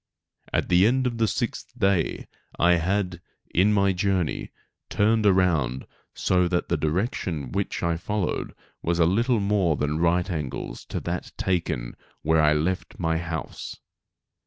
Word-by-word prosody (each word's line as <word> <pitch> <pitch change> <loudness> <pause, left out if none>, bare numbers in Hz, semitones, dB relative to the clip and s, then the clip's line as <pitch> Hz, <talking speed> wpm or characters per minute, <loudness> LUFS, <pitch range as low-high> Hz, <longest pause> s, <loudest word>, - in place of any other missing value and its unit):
At - - 0
the 90 +3 +5
end 130 +2 +2
of 120 -2 -1
the 110 - +3
sixth 120 +3 -3
day 95 -7 +1 0.3
I 85 0 +4
had, 90 0 -1 0.3
in 95 +5 +4
my 100 -2 +3
journey, 90 -3 -1 0.4
turned 110 +1 +3
around 85 -10 +2 0.3
so 90 -1 +2
that 90 0 -1
the - - +2
direction 80 - -2
which - - -2
I 85 -1 +1
followed 100 +2 -2 0.3
was 85 0 0
a 85 - +4
little 115 +7 +2
more 100 -5 +2
than 75 +2 -1
right 85 +1 +2
angles 75 -8 -4
to - - -4
that - - -4
taken 85 -10 -1 0.3
where 80 0 +3
I 75 -1 +5
left 85 +5 -1
my 80 -2 0
house. 80 -2 -5
90 Hz, 150 wpm, -25 LUFS, 80-100 Hz, 0.4 s, the